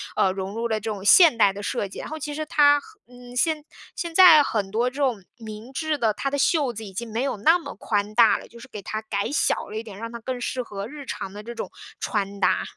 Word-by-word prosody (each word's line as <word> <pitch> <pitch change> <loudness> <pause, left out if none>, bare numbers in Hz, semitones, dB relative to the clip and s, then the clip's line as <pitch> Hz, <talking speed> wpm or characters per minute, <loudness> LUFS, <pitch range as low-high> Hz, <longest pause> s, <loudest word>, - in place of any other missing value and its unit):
呃， 190 - +3
融 190 +2 -5
入 235 +1 -1
了 220 -2 -1
这 220 - -5
种 200 -2 -6
现 320 - +7
代 200 -3 +4
的 205 - -7
设 200 0 -2
计。 195 - -10
然 - - -7
后 315 - -5
其 295 -1 -5
实 310 +1 -4
它 290 -2 +5
和 425 +6 -18
嗯， 245 0 -13
现 310 +3 +1 0.3
现 340 -1 -4
在 350 -5 +9
很 205 -8 -2
多 235 +3 +1
这 250 - -18
种 260 -8 0
明 220 +2 -9
制 310 +1 -1
的， 225 -5 +1
它 275 - -2
的 285 - -1
袖 280 -4 +2
子 220 0 -7
已 200 - -9
经 230 +3 -5
没 230 +3 -1
有 270 -6 -2
那 320 - +4
么 285 - -9
宽 210 0 -2
大 230 -2 +6
了， - - -12
就 235 - -15
是 250 - -12
给 210 -5 -8
它 215 +3 -4
改 200 -2 -2
小 - - 0
了 210 - -8
一 225 - -4
点， 210 -4 -10
让 230 0 -6
它 235 - -7
更 250 +2 -5
适 250 +1 -2
合 200 -2 -6
日 290 0 -9
常 190 - -5
的 210 +1 -9
这 235 +1 -7
种 230 - -6 0.3
穿 200 -2 -2
搭。 - - +2
235 Hz, 290 characters per minute, -24 LUFS, 210-285 Hz, 0.3 s, 在